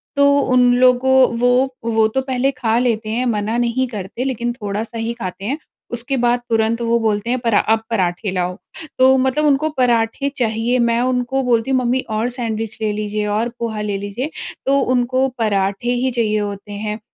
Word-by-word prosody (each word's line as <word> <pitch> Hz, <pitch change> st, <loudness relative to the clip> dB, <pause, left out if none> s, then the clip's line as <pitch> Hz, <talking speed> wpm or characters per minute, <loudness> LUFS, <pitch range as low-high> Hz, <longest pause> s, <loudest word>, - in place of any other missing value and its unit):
तो 280 Hz, 0 st, +4 dB, 0.3 s
उन 250 Hz, -1 st, +5 dB
लोगों 255 Hz, +1 st, +4 dB, 0.2 s
वो 245 Hz, 0 st, +3 dB, 0.4 s
वो 220 Hz, -1 st, +3 dB
तो 265 Hz, -, +1 dB
पहले 260 Hz, +1 st, +1 dB
खा 230 Hz, -2 st, +1 dB
लेते 225 Hz, -3 st, 0 dB
हैं 245 Hz, +3 st, -1 dB
मना 220 Hz, 0 st, -1 dB
नहीं 245 Hz, +2 st, 0 dB
करते 215 Hz, +2 st, -5 dB
लेकिन 240 Hz, -2 st, -2 dB
थोड़ा 210 Hz, -2 st, -4 dB
सा 230 Hz, 0 st, -9 dB
ही 225 Hz, +1 st, -2 dB
खाते 195 Hz, -3 st, -6 dB
हैं 275 Hz, +6 st, -1 dB, 0.4 s
उसके 240 Hz, +3 st, -2 dB
बाद 240 Hz, 0 st, +3 dB
तुरंत 225 Hz, +1 st, +1 dB
वो 235 Hz, 0 st, +2 dB
बोलते 215 Hz, 0 st, -1 dB
हैं 255 Hz, 0 st, +1 dB
परा 230 Hz, -4 st, +2 dB
अब 225 Hz, 0 st, -1 dB
पराठे 185 Hz, -2 st, -1 dB
लाओ। 180 Hz, 0 st, -2 dB, 0.4 s
तो 260 Hz, +1 st, +6 dB
मतलब 265 Hz, +4 st, +1 dB
उनको 295 Hz, +2 st, +2 dB
पराठे 240 Hz, +2 st, +1 dB
चाहिए। 235 Hz, +1 st, 0 dB
मैं 235 Hz, 0 st, +2 dB
उनको 255 Hz, +1 st, 0 dB
बोलती 240 Hz, +1 st, +1 dB
हूँ, 260 Hz, -, +3 dB
"मम्मी 250 Hz, +2 st, +1 dB
और 220 Hz, +2 st, 0 dB
सैंडविच 225 Hz, -3 st, -4 dB
ले 215 Hz, -1 st, 0 dB
लीजिए 210 Hz, 0 st, -2 dB
और 235 Hz, +2 st, 0 dB
पोहा 220 Hz, -2 st, -3 dB
ले 205 Hz, -1 st, -2 dB
लीजिए।" 205 Hz, +9 st, -4 dB, 0.4 s
तो 275 Hz, +1 st, +3 dB
उनको 255 Hz, +1 st, +1 dB
पराठे 200 Hz, +1 st, 0 dB
ही 255 Hz, +1 st, 0 dB
चाहिए 215 Hz, -3 st, 0 dB
होते 205 Hz, 0 st, -5 dB
हैं। 210 Hz, +1 st, -4 dB
235 Hz, 190 wpm, -19 LUFS, 215-255 Hz, 0.4 s, तो